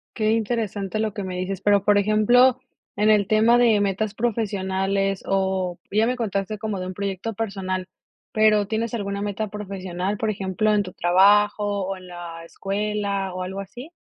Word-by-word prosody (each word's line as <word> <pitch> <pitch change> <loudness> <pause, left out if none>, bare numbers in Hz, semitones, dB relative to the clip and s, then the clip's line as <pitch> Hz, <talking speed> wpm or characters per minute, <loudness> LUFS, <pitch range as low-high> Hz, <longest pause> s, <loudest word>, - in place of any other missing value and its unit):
Qué 215 0 +1
interesante 215 -3 -1
lo 215 -2 -1
que 200 - -4
me 185 -1 -5
dices. 185 +1 -3
Pero, 200 0 +3
por 205 0 +4
ejemplo, 215 +5 +4 0.4
en 210 +1 +2
el 210 -2 +4
tema 220 +3 +4
de 230 -4 +4
metas 200 +1 -1
profesionales 195 -3 -1
o 190 -2 0
ya 215 +2 +3
me 250 - 0
contaste 215 -3 -2
como 210 -2 -3
de 185 - -4
un 185 - -5
proyecto 200 +3 -3
personal, 190 -3 -3 0.4
pero, 215 -1 +4
¿tienes 225 +2 -2
alguna 200 -2 -3
meta 205 +1 -3
profesional, 195 -1 -4
por 220 +1 -1
ejemplo, 195 +1 0
en 205 -1 +2
tu 185 -2 -9
trabajo 205 +2 +3
o 195 0 -4
en 185 0 -13
la 170 -2 -8
escuela 200 0 -2
o 185 0 -4
algo 190 +2 -5
así? 245 - -9
200 Hz, 175 wpm, -23 LUFS, 190-215 Hz, 0.4 s, por